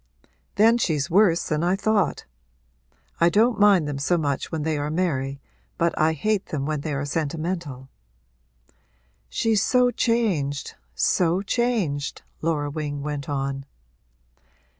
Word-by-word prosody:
'Then 225 +4 +5
she's 155 - 0
worse 175 -3 +4
than 155 0 -1
I 180 +2 +2
thought. 205 -1 0 0.9
I 170 - +5
don't 225 +5 +2
mind 200 -6 +5
them 145 -2 -3
so 175 +6 +1
much 145 -4 -2
when 160 -2 -2
they 160 0 0
are 145 +1 -2
merry 140 -5 -1 0.4
but 170 0 +1
I 160 +1 +2
hate 200 +6 -1
them 140 -3 -3
when 155 -1 -2
they 155 - -4
are 145 +1 -2
sentimental.' 155 -2 -3 1.4
'She's 220 - +1
so 250 +2 +3
changed 190 - 0 0.2
so 175 - +2
changed!' 205 - -1 0.2
Laura 150 -3 -1
Wing 145 -2 -4
went 145 -1 -4
on. 135 -1 -3
160 Hz, 135 wpm, -24 LUFS, 145-200 Hz, 1.4 s, Then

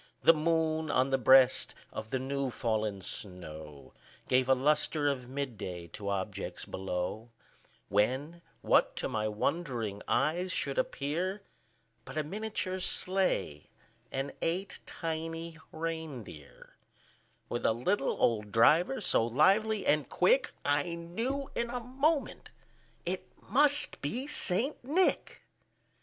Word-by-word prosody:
The 165 - +8
moon, 160 0 +1
on 130 0 +2
the 135 - +3
breast 130 0 +5 0.2
of 110 0 -6
the 130 - 0
new 135 +1 -2
fallen 110 -4 -1
snow, 80 -7 -8 0.3
Gave 130 0 +3
a 130 - +6
lustre 150 +2 +1
of 130 -3 -1
mid 130 -5 -4
day 85 -2 -6
to 100 +2 -5
objects 95 -1 -3
below; 95 +4 -4 0.6
When, 130 - 0 0.2
what - - +3
to - - -2
my 110 -4 -1
wondering 115 - -2
eyes 175 +5 +1
should 140 -4 -1
appear, 180 +8 -2 0.6
But - - -9
a 155 - +1
miniature 195 +1 -3
sleigh, 185 - 0 0.4
and 135 +1 -3
eight 185 +4 -2
tiny 165 0 -4
rein 160 -6 -4
deer, 75 -7 -14 0.7
With 120 - -3
a - - +4
little 135 - 0
old 105 -3 +1
driver, 135 - +4
so - - +3
lively 195 - +3
and 150 -3 +2
quick, - - +3
I 145 +4 +1
knew 230 +12 -3
in 235 0 -1
a 245 +1 -3
moment 275 +5 0 0.6
it - - -3
must 295 0 +2
be 240 - -2
St. 260 -1 0
Nick. 325 +9 +1
145 Hz, 125 wpm, -31 LUFS, 115-185 Hz, 0.7 s, The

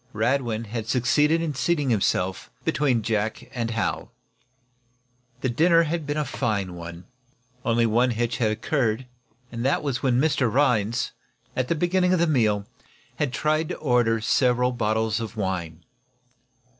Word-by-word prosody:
Radwin 115 0 0
had 110 0 -5
succeeded 150 +7 +2
in 155 -3 -2
seating 145 0 0
himself 95 -3 0 0.2
between 130 -6 +1
Jack 110 +3 -2
and 115 -2 -2
Hal. 115 -2 -2 1.3
The 130 - 0
dinner 165 +7 +4
had 160 -1 -3
been 145 +1 -2
a 150 - 0
fine 100 -7 -2
one. 85 0 -9 0.6
Only 115 0 +2
one 120 +3 +3
hitch 120 0 -1
had 110 -3 +1
occurred; 115 +1 -1 0.5
that 120 +5 0
was 140 -4 -2
when 125 -2 +2
Mr. 140 -5 +2
Rhinds, 120 -3 +1 0.4
at 130 -1 0
the 170 - +1
beginning 180 +2 +2
of 185 - +2
the 170 - +4
meal, 110 -10 +1 0.5
had 145 -4 0
tried 155 +3 0
to - - -4
order 120 -5 +2
several 125 +2 +2
bottles 110 -1 0
of 115 0 -6
wine. 85 -5 -3
120 Hz, 145 wpm, -25 LUFS, 110-145 Hz, 1.3 s, dinner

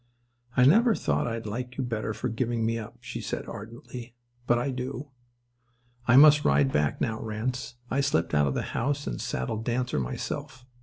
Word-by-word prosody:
"I 125 - +7
never 225 - +6
thought 75 +6 0
I'd 115 -1 -3
like 125 +4 -5
you 135 - 0
better 110 -3 -2
for - - -3
giving 115 0 -1
me 115 0 0
up," 115 +2 -9
she 125 0 -6
said - - -4
ardently, 120 +2 -8 0.3
"but 120 - +4
I 125 +3 -1
do. 130 +2 -5 1.0
I 125 - +6
must 150 +1 +8
ride 70 -1 +3
back 75 0 +1
now, 110 -1 -1
Ranse. 120 +3 -3 0.2
I 140 - +2
slipped 85 - +1
out 75 -1 +4
of 70 - -1
the - - 0
house 145 +4 -1
and - - -3
saddled 105 - -2
Dancer 125 - 0
myself. 120 - -4
120 Hz, 185 wpm, -28 LUFS, 110-130 Hz, 1.0 s, must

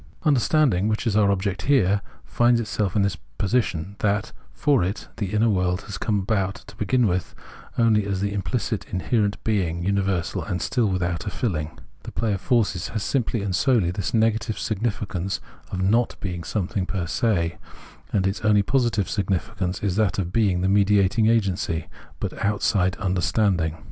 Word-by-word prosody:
Understanding, 130 - +3
which 110 +2 -1
is 110 -4 +1
our 105 -2 +4
object 100 0 -1
here, 100 -8 +3 0.2
finds 120 0 +3
itself 105 -3 -2
in 100 - +3
this 100 - 0 0.2
position, 100 -3 -1
that, 105 0 0 0.2
for 140 -9 +2
it, 95 +5 -3
the 100 - -2
inner 110 +2 +3
world 90 -3 +1
has 100 -1 -7
come 105 -3 0
about, 95 -1 0
to 100 - -13
begin 125 +2 +2
with, 90 -4 -1 0.4
only 110 -3 +3
as 100 -2 -1
the 100 +1 -1
imphcit 110 +2 -2
inherent 100 +2 0
being, 90 -6 0
universal 95 -3 0
and 90 -3 -3
still 120 -4 +1
without 90 0 -1
a - - +1
filling. 80 -8 -3 0.2
The - - -8
play 110 -2 0
of 95 - -3
forces 105 -8 +1
has 110 -2 -3
simply 120 -5 0
and 95 -3 -1
solely 110 - +2
this 95 0 -3
negative 115 0 +1
significance 100 -4 -2 0.3
of 95 0 -2
not 115 +5 +2
being 90 -3 -4
something 95 +1 -2
j^er 90 -4 -2
se; 85 -4 0 0.5
and 95 -3 +1
its 95 +1 -1
only 105 -2 +4
positive 120 -4 +1
significance 95 -1 -2
is 100 -2 0
that 105 -5 +2
of 90 -2 -2
being 100 -6 +2
the 95 - +1
mediating 100 +2 +3
agency, 95 -7 +1 0.3
but - - -3
outside 100 -3 +1
understanding. 90 -3 +1
100 Hz, 170 wpm, -24 LUFS, 95-110 Hz, 0.5 s, our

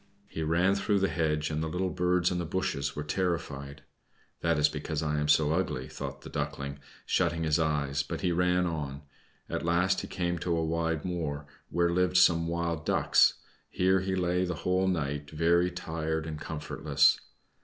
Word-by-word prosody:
He 80 - -6
ran 85 +5 +2
through 100 +1 +1
the 95 0 +2
hedge, 75 -2 0
and 75 0 -1
the 80 - -1
little 90 +2 -1
birds 90 -1 +1
in 90 - -1
the - - -1
bushes 75 -6 -2
were 75 - -3
terrified. 75 -4 -3 0.6
"That 85 -2 +1
is 75 0 +5
because 75 +1 -3
I 75 -1 0
am 75 - 0
so 75 +1 +4
ugly," 80 -8 -1
thought 70 0 -7
the - - -9
Duckling, 70 0 -4 0.3
shutting 85 -2 +1
his 80 0 +2
eyes, 75 -3 0
but - - -5
he 90 - +1
ran 90 +1 +2
on. 75 -4 -4 0.4
At - - -3
last 90 +3 +2
he - - -7
came 85 -1 -2
to 85 -1 0
a 80 - 0
wide 80 -1 -1
moor, 80 -5 -3 0.2
where 85 0 +1
lived 90 +1 +2
some 85 -2 +5
Wild 85 -2 -2
Ducks; - - +4 0.3
here 95 +1 +2
he 95 0 -1
lay 90 0 +1
the 90 -1 -2
whole 95 +1 +2
night, 75 -5 -2
very 85 +3 +2
tired 80 -2 -3
and 75 -2 -6
comfortless. 80 -2 +2
85 Hz, 185 wpm, -29 LUFS, 75-90 Hz, 0.6 s, is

